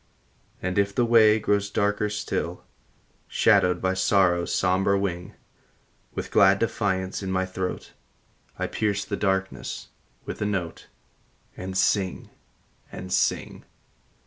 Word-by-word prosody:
And 90 +2 0
if 100 0 0
the 120 - +3
way 110 -2 +6
grows 100 -1 0
darker 105 +1 0
still, 105 0 -3 0.6
Shadowed 90 -1 +3
by 95 0 +2
Sorrow 95 -2 +3
s - - -5
somber 95 +2 +2
wing, 90 -3 -3 0.8
With - - -5
glad 95 0 +5
defiance 95 -4 -1
in 95 -1 -3
my 95 0 0
throat, 95 0 -5 0.6
I - - -1
pierce 100 -2 -1
the 100 - -3
darkness 95 -1 -2 0.4
with - - -6
a - - +1
note, 95 -5 -4 0.7
And 95 +1 -5
sing, 95 -1 0 0.6
and 95 0 -6
sing. - - 0
95 Hz, 125 wpm, -25 LUFS, 95-100 Hz, 0.8 s, way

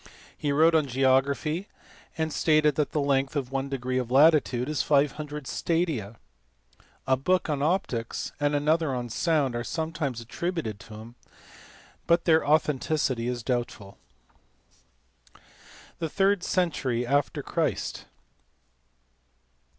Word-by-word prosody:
He 145 - -2
wrote 160 +4 +4
on 155 -3 +3
geography, 135 - +1 0.5
and 160 -1 -1
stated 155 -1 +3
that 145 -1 -1
the 150 - -1
length 140 0 0
of 135 -3 -2
one 135 0 -2
degree 130 -1 -2
of 125 -2 -4
latitude 135 -3 +4
is 150 -4 0
500 150 +1 0
stadia. 150 - -2 0.9
A 130 0 +3
book 175 +5 0
on 140 -2 -1
optics 145 - -1
and 145 0 +1
another 150 -1 +1
on 120 -1 -4
sound 145 0 0
are 120 - -2
sometimes 160 -4 -3
attributed 120 - -4
to 105 +2 -12
him, 115 +2 -11 0.9
but 170 0 +3
their 160 -1 +4
authenticity 145 -4 +1
is 125 -2 -3
doubtful. 120 -6 -4 2.0
The 165 -2 -2
third 195 +2 +2
century 145 -11 0
after 140 +3 0
Christ. - - -2
145 Hz, 120 wpm, -27 LUFS, 125-160 Hz, 2.0 s, wrote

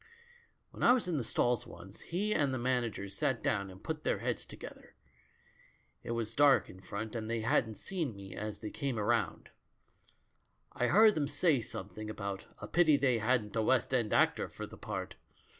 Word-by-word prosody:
"When - - -11
I 245 - +7
was 245 -7 0
in 170 -4 0
the 130 - -1
stalls 120 +1 +1
once, 95 +4 -12
he 205 +5 -1
and 145 -7 +2
the 130 - -1
manager 120 -5 -1
sat 100 0 -1
down 100 -1 0
and 95 +1 -13
put 155 -1 -4
their - - +1
heads - - -2
together. - - -11 1.1
It - - -9
was 115 -2 -2
dark 145 -1 +4
in 95 - -13
front, 105 +3 -5
and 110 -1 -3
they 115 -1 -1
hadn't 110 0 +1
seen 160 - -3
me 95 -1 -9
as 105 0 -5
they 105 - -5
came 135 -4 -2
round. 110 +1 0 1.2
I 125 - +1
heard 215 - +7
them 145 -5 0
say 145 0 +2
something 105 -1 -7
about 100 -2 -5
'a - - -7
pity 160 -4 +4
they 130 -4 +2
hadn't 110 -2 +1
a 110 - +2
West 130 +4 +2
End 120 -5 +1
actor - - +3
for - - -7
the - - -11
part.' - - -5
115 Hz, 190 wpm, -33 LUFS, 105-145 Hz, 1.2 s, I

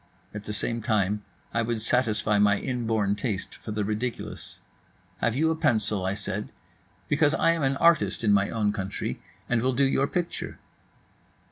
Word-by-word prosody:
At 105 0 -7
the - - -4
same 115 +2 -1
time 105 -1 +1 0.3
I 115 - +2
would 115 0 -1
satisfy 110 -3 +2
my 100 -1 +4
inborn 110 -6 0
taste 105 -2 -3
for - - -7
the 105 -1 -1
ridiculous. 110 +3 -4 0.6
"Have 120 - 0
you 160 +4 +2
a - - 0
pencil?" 105 -9 +1
I 95 - 0
said. 105 0 -4 0.6
"Because 145 +1 +3
I 165 - +4
am 165 -1 -1
an 135 0 +1
artist 170 -6 +3
in 105 -2 +4
my 100 0 +3
own 105 -2 0
country, 95 0 -4 0.3
and 120 -2 +1
will 130 +2 +1
do 135 +3 +3
your 135 +1 +2
picture." 175 +2 -3
110 Hz, 170 wpm, -27 LUFS, 105-130 Hz, 0.6 s, my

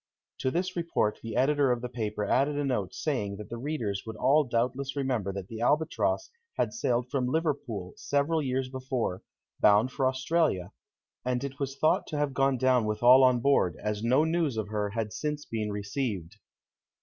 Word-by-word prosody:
To 130 - 0
this 180 +6 -2
report 165 -11 0
the 115 -1 -6
editor 140 0 +3
of 120 -1 0
the - - -1
paper 105 -4 -3
added 140 +7 +2
a 145 - 0
note 115 -9 -1
saying 110 -9 -2
that 105 +1 -9
the 120 - -5
readers 120 -8 -2
would 110 -1 -7
all 140 +7 +4
doubtless 125 +3 -1
remember 125 -8 -1
that 95 -1 -6
the 115 +1 -7
Albatross 150 - +1 0.3
had - - 0
sailed 125 - -1
from 130 -3 0
Liverpool 130 - -2
several 145 +3 0
years 130 -1 -1
before, 130 -7 -3 0.4
bound 105 +5 +5
for 135 0 +1
Australia, 130 - 0 0.5
and 125 +1 -1
it 140 0 -6
was 135 -1 -3
thought 155 - +2
to 150 - -4
have 145 -2 0
gone 135 0 +2
down 130 -2 +3
with 105 +1 -2
all 130 +2 +8
on 125 -2 +4
board, 135 -9 +2
as 105 -1 -2
no 130 +6 +4
news 160 -6 0
of 105 -2 -3
her 105 -1 -1
had 110 0 -3
since 150 -1 -3
been 110 -2 -3
received. 100 -3 -3
125 Hz, 185 wpm, -28 LUFS, 110-140 Hz, 0.5 s, all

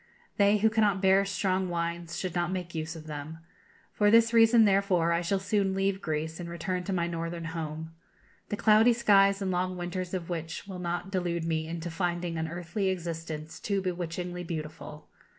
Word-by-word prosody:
'They 205 +1 +5
who 215 +2 +3
cannot 210 -3 +2
bear 190 0 +4
strong 190 -1 0
wines 170 0 -3
should 185 -1 -3
not 175 0 0
make 180 -2 -4
use 160 0 -4
of 155 -1 -9
them.' 150 +1 -6 0.6
For 205 -1 +3
this 230 +1 +5
reason, 225 0 +6
therefore, 195 -4 +3
I 170 0 +2
shall 185 +3 0
soon 195 0 0
leave 195 0 0
Greece, 160 +1 -3
and 170 -1 -6
return 170 +2 -3
to 200 - -3
my 175 -3 +1
Northern 170 0 -4
home, 160 -1 -5 0.6
the 210 - -2
cloudy 220 +3 +5
skies 200 -3 +4
and 190 - -1
long 185 0 -1
winters 180 +1 -4
of 175 -3 -4
which 165 0 -5
will 190 -2 -6
not 175 +2 -3
delude 175 -3 -1
me 160 -1 -1
into 170 +1 -5
finding 175 0 -2
an 160 - -1
earthly 180 +4 -2
existence 165 -3 -5
too 200 -2 -1
bewitchingly 180 -1 -4
beautiful. 155 -2 -7
175 Hz, 185 wpm, -29 LUFS, 165-195 Hz, 0.6 s, reason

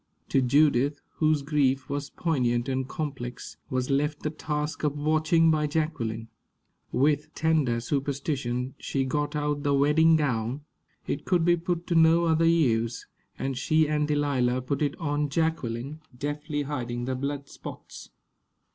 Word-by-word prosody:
To 135 - +3
Judith, 140 +1 +3 0.2
whose 155 -2 +2
grief 140 -3 +1
was 140 0 -3
poignant 125 -7 0
and 130 -1 -1
complex, 130 -5 -5
was 130 +1 -1
left 150 +2 0
the 150 - -1
task 150 0 -3
of 150 -1 0
watching 155 +2 +3
by 150 -1 +1
Jacqueline. 125 -8 -2 0.6
With 145 +2 +1
tender 155 -7 +2
superstition, 135 -1 -2
she 135 -1 -1
got 145 +2 -1
out 145 -1 -1
the 145 -1 +2
wedding 150 +4 +5
gown 125 -3 -1 0.4
it 145 - -3
could 175 -3 +2
be 175 0 +5
put 170 0 -3
to 180 - -1
no 165 +1 +5
other 165 0 +3
use 120 -8 +2 0.3
and 135 0 -2
she 155 +4 +2
and 150 0 0
Delilah 135 -4 +1
put 140 +4 -2
it 145 -2 0
on 145 -2 -1
Jacqueline, 145 -2 -2 0.2
deftly 145 +1 -3
hiding 120 -4 -3
the 130 - -1
blood 140 +2 -3
spots. - - -10
145 Hz, 145 wpm, -27 LUFS, 130-155 Hz, 0.6 s, wedding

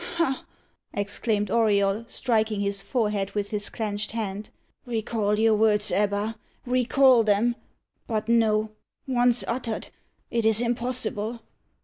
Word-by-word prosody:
"Ha!" 300 -6 0 0.5
exclaimed 205 0 -1
Auriol, 210 -1 +2
striking 220 -4 0
his 200 0 -1
forehead 210 -4 -1
with 205 -1 -2
his 205 -1 -3
clenched 210 -2 -4
hand. 210 -2 -4 0.4
"Recall 220 -2 -1
your 220 0 +4
words 210 -1 +3
Ebba 205 +2 0 0.3
recall 255 0 +4
them 220 +3 +2 0.5
but 215 -1 -2
no, 220 -2 +2 0.3
once 245 -2 +2
uttered 230 -2 -3 0.4
it 235 -1 0
is 220 0 +4
impossible. 235 -2 -2
220 Hz, 115 wpm, -25 LUFS, 210-235 Hz, 0.5 s, your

